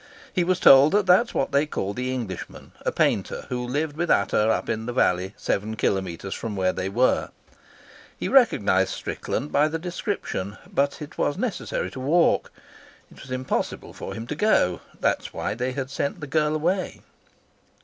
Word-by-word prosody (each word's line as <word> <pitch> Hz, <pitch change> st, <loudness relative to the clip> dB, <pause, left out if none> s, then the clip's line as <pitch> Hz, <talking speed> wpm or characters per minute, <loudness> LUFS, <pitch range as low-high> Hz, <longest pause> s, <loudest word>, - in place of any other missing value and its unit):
He 180 Hz, -, +2 dB
was 185 Hz, +1 st, +1 dB
told 135 Hz, +3 st, +8 dB
that 205 Hz, -1 st, +3 dB
that 185 Hz, +6 st, +6 dB
was -, -, -11 dB
what -, -, 0 dB
they 140 Hz, +2 st, +2 dB
called 100 Hz, -8 st, -3 dB
the 125 Hz, +1 st, -2 dB
Englishman, 115 Hz, -8 st, -6 dB
a -, -, 0 dB
painter, -, -, 0 dB
who 125 Hz, -1 st, -2 dB
lived 145 Hz, +4 st, -2 dB
with 170 Hz, +2 st, -2 dB
Ata 105 Hz, +2 st, +3 dB
up -, -, 0 dB
in 110 Hz, +1 st, -2 dB
the 120 Hz, -, -3 dB
valley 95 Hz, -4 st, +1 dB
seven 110 Hz, +2 st, -2 dB
kilometres 95 Hz, -2 st, -2 dB
from 110 Hz, -3 st, -5 dB
where 95 Hz, -1 st, +1 dB
they 95 Hz, -, -3 dB
were. 125 Hz, +6 st, +2 dB, 0.9 s
He -, -, -3 dB
recognised 105 Hz, -, +4 dB
Strickland 145 Hz, -, -4 dB
by 145 Hz, +2 st, +4 dB
the 160 Hz, +1 st, -2 dB
description. 170 Hz, -, -4 dB
But 140 Hz, +2 st, -1 dB
it 150 Hz, -, -11 dB
was 145 Hz, -, +1 dB
necessary 230 Hz, 0 st, -2 dB
to -, -, -8 dB
walk. 160 Hz, +7 st, +2 dB, 0.6 s
It -, -, -14 dB
was 135 Hz, -, -12 dB
impossible 130 Hz, 0 st, -3 dB
for -, -, -7 dB
him 115 Hz, -, -6 dB
to 150 Hz, -, -4 dB
go; 145 Hz, -, +2 dB, 0.2 s
that -, -, +2 dB
was -, -, -10 dB
why -, -, -2 dB
they 125 Hz, +3 st, -2 dB
had 135 Hz, 0 st, -4 dB
sent 140 Hz, +4 st, -2 dB
the 150 Hz, -, -5 dB
girl 150 Hz, +1 st, +1 dB
away. 180 Hz, +5 st, -1 dB
130 Hz, 185 wpm, -24 LUFS, 105-155 Hz, 0.9 s, told